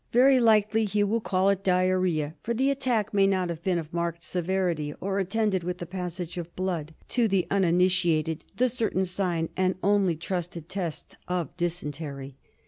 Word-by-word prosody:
Very 260 +2 +6
likely 220 -1 +4
he 205 0 +1
will 220 +3 0
call 190 -1 +2
it 195 0 -2
diarrhoea, 185 -5 +1
for 235 - -2
the 265 +4 +2
attack 240 -6 0
may 195 -1 +4
not 185 -2 +1
have 170 -1 -5
been 180 0 +1
of 160 -1 -6
marked 170 0 -2
severity, 175 -4 -1
or 195 +1 -1
attended 195 -1 0
with 180 +1 -3
the 175 - -6
passage 180 -1 -5
of 170 0 -8
blood 170 -4 -3
— - - -28
to 240 -2 +2
the 195 -3 +1
uninitiated 175 -4 +2
the 255 - +4
certain 220 -6 0
sign 175 -3 -1
and 185 0 +1
only 200 -4 +3
trusted 170 -1 -4
test 175 -5 -5
of 180 -5 -2
dysentery. 145 -5 -4
185 Hz, 175 wpm, -27 LUFS, 170-200 Hz, -, Very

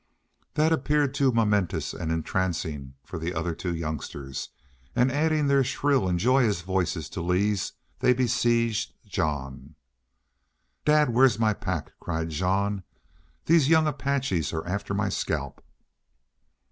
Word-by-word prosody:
That 155 +2 +3
appeared 145 -1 +1
too 140 -2 +3
momentous 105 -5 +1
and 80 - -3
entrancing 80 -5 -2
for 90 - -7
the 85 +2 -3
other 80 +1 -1
two 85 +1 -3
youngsters, 70 -4 -5 0.5
and, 125 +1 +3
adding 155 +1 +2
their 140 -1 +4
shrill 135 -4 +1
and 90 - +1
joyous 120 -2 +3
voices 90 -4 -1
to - - -5
Lee's, 95 +3 0 0.3
they - - +4
besieged 115 -2 +1
Jean. 75 -6 -3 1.1
"Dad, 150 -3 +4
where's 125 -1 +5
my 110 -1 +2
pack?" - - -4
cried 80 -1 -3
Jean. 95 +4 0 0.6
"These 160 -4 +4
young 160 -1 +5
Apaches 135 - -1
are 80 0 -3
after 100 +2 -3
my 100 0 0
scalp." - - -3
100 Hz, 130 wpm, -26 LUFS, 85-130 Hz, 1.1 s, where's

